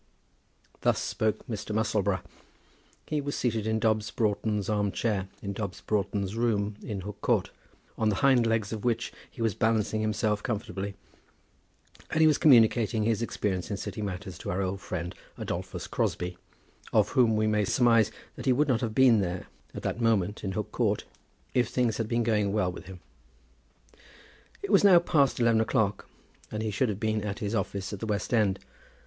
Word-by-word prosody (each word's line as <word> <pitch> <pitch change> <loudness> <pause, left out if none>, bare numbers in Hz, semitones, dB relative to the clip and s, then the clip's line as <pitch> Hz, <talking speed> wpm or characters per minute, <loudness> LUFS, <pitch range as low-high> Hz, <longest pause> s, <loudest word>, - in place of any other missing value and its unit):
Thus - - +3
spoke 110 -1 -1
Mr. 105 -2 -4
Musselboro. 100 -3 +1 0.8
He 150 -1 -1
was 145 0 -3
seated 110 -3 -1
in 110 0 +1
Dobbs 110 -1 +1
Broughton's 105 -1 0
arm 105 -2 +1
chair 100 -1 -1 0.2
in 100 0 -3
Dobbs 100 -2 -5
Broughton's 100 -1 -1
room 105 -3 0
in 100 -4 -5
Hook 105 +1 -8
Court, - - +1 0.5
on 110 - +3
the 105 - +1
hind 125 -4 +5
legs 115 -1 0
of 110 - -5
which 115 -1 -1 0.2
he 115 - -5
was 110 -3 +1
balancing 110 0 +1
himself 110 -1 0
comfortably; 100 -4 -4 1.1
and 160 - -1
he 160 - +6
was 155 -1 +4
communicating 115 -5 +5
his 115 0 +1
experience 100 -5 -2
in 100 - -2
City 105 - -5
matters 95 -1 -5
to - - -6
our 95 +2 0
old 95 +1 -3
friend, 90 0 -4 0.2
Adolphus - - -4
Crosbie, 90 0 -2 0.6
of 105 -1 +3
whom 120 -5 +3
we 110 0 +2
may 105 -1 +2
surmise 115 -1 +4 0.3
that - - -7
he 130 - +5
would 145 +4 +2
not 125 -3 +1
have 110 -3 -2
been 125 -4 +6
there, 90 -1 -3 0.3
at - - -6
that 120 - -2
moment, 105 -3 +1
in 95 -2 -2
Hook 105 +1 -3
Court, 105 -4 0 0.5
if 125 -3 +2
things 120 -4 +1
had 115 - -2
been 120 +1 +1
going 105 -3 +1
well 100 -3 +1
with 90 - -10
him. 95 -2 -10 1.6
It 200 - -3
was 200 - +5
now 195 -3 +8
past 150 -7 +2
eleven 115 -2 +4
o'clock, 105 -2 0 0.4
and 110 0 -3
he 110 - -1
should 120 +4 +1
have 100 -1 -3
been 110 -1 0
at 100 -1 -3
his 105 -3 -3
office 100 -2 -2
at 100 - -5
the 110 - -4
West 105 +2 -2
End. 105 -4 +3
110 Hz, 185 wpm, -28 LUFS, 100-115 Hz, 1.6 s, now